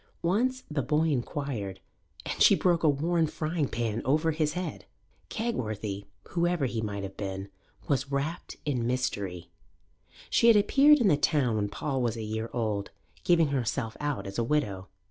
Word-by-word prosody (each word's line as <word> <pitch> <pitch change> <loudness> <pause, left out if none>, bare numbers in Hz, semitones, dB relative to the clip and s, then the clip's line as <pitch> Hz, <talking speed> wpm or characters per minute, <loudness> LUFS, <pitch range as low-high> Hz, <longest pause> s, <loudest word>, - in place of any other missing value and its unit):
Once 250 +9 +1
the 150 -2 -1
boy 150 +5 +1
inquired, 125 -7 -3 0.5
and - - -4
she - - +8
broke 175 -2 +2
a 155 - +4
worn 160 +3 +1
frying 155 -1 -1
pan 115 -2 -2
over 155 +5 +2
his 155 -1 0
head. 180 +1 -5 0.4
Kegworthy, 110 - -3 0.2
whoever 175 -3 +1
he 120 -3 -2
might 100 -2 -4
have 95 0 -6
been, 95 -1 -5 0.4
was 140 -1 0
wrapt 140 +5 -3
in 125 -6 0
mystery. 100 -9 -2 0.8
She 230 - +4
had 230 -2 +8
appeared 280 +8 +6
in 225 - +4
the 150 - +4
town 140 -6 +2
when 105 -1 0
Paul 135 +4 -2
was 120 -2 0
a 110 - -4
year 110 +1 -3
old, 105 -4 -2 0.3
giving 165 -4 +4
herself 125 -3 -1
out 145 -2 -2
as 100 +3 -4
a - - +2
widow. 110 -9 -1
140 Hz, 165 wpm, -28 LUFS, 110-160 Hz, 0.8 s, she